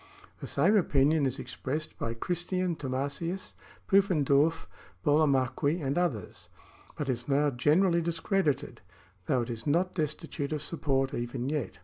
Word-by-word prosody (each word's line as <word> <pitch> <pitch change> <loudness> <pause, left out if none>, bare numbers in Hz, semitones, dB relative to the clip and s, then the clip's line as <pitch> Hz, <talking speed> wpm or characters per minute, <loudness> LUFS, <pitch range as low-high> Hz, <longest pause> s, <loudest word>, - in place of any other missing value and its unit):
The - - -6
same 175 +10 +3
opinion 150 -4 +3
is 130 +1 -3
expressed 150 +3 -4
by 115 0 -2
Christian 175 +5 -1
Thomasius,^ 140 +7 -3 0.3
Pufen 195 -6 +3
dorf,^ 145 +4 +2 0.4
Burlamaqui,* 145 +1 +2
and 140 -3 -1
others, 150 - -2 0.5
but 145 - -3
is 125 -2 -2
now 145 +1 +2
generally 170 +8 +3
dis 170 0 -2
credited, 190 -9 0 0.5
though 125 -2 +2
it 120 - -5
is 115 +2 -6
not 175 +5 +2
destitute 155 -2 -3
of 150 -1 -3
support 135 -5 -1
even 120 +2 -3
yet. 145 -10 -3
145 Hz, 140 wpm, -29 LUFS, 135-170 Hz, 0.5 s, same